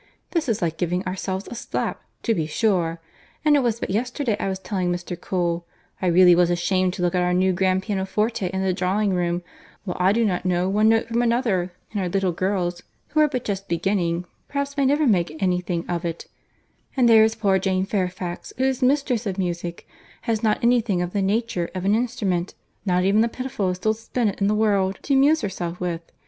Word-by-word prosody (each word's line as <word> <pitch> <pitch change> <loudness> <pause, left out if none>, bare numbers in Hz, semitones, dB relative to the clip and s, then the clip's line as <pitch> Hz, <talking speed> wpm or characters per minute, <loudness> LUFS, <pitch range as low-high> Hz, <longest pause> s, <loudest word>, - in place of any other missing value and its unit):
This 325 -7 0
is 215 -5 0
like 165 -1 -2
giving 180 +2 -1
ourselves 190 +1 -3
a - - -4
slap, 235 - -3 0.2
to 230 - +2
be 160 -7 -1
sure! 170 -3 0 0.5
and 300 -1 +6
it - - +5
was 235 -3 0
but - - -3
yesterday 245 +2 -1
I - - -1
was 190 - -2
telling 190 -2 -2
Mr. 175 0 -4
Cole, 175 -1 -2 0.3
I 185 - +1
really 180 +1 +7
was 175 0 +4
ashamed 180 +1 +1
to 180 - -3
look 175 - +1
at 180 - +2
our 180 0 +1
new 185 +1 +3
grand 190 +1 +1
pianoforte 205 +1 -1
in 190 +1 -2
the 190 -1 +1
drawing 190 +2 0
room, 175 0 -1 0.4
while 185 -4 -4
I 185 +2 +4
do 230 +2 +2
not 185 -4 0
know 180 0 +1
one 210 +3 +3
note 225 0 +3
from 230 +1 0
another, 230 -7 +1 0.2
and 205 - -2
our 180 - -1
little 195 0 +1
girls, 180 -1 -1 0.3
who 310 - 0
are 305 - +6
but 255 -4 -3
just 195 -1 -3
beginning, 175 0 0 0.2
perhaps 280 0 -3
may 280 -2 +2
never 295 +3 +3
make 175 - +1
any 180 -2 +1
thing 175 -1 -3
of 175 0 -2
it; 170 -1 -4 0.7
and 250 -2 +5
there 225 -1 +7
is 220 0 +2
poor 195 -3 +2
Jane 185 0 0
Fairfax, 185 -3 -3
who 260 - 0
is 265 -1 +1
mistress 255 -4 +1
of 190 -1 -3
music, 175 -2 -3 0.4
has 225 -2 0
not 220 -1 +1
any 240 0 +4
thing 195 -6 -1
of 175 - -5
the 200 - +1
nature 200 -3 0
of 185 0 -3
an 200 - +3
instrument, 215 -7 -1 0.3
not 180 0 +2
even 200 +3 +4
the 230 - +2
pitifullest 200 -8 -3
old 215 0 +2
spinet 225 -2 -2
in 195 - +3
the 210 - +2
world, 200 -3 +2
to 280 - 0
amuse 290 +4 +4
herself 180 -3 -4
with. 175 -2 -2
190 Hz, 215 wpm, -23 LUFS, 180-225 Hz, 0.7 s, really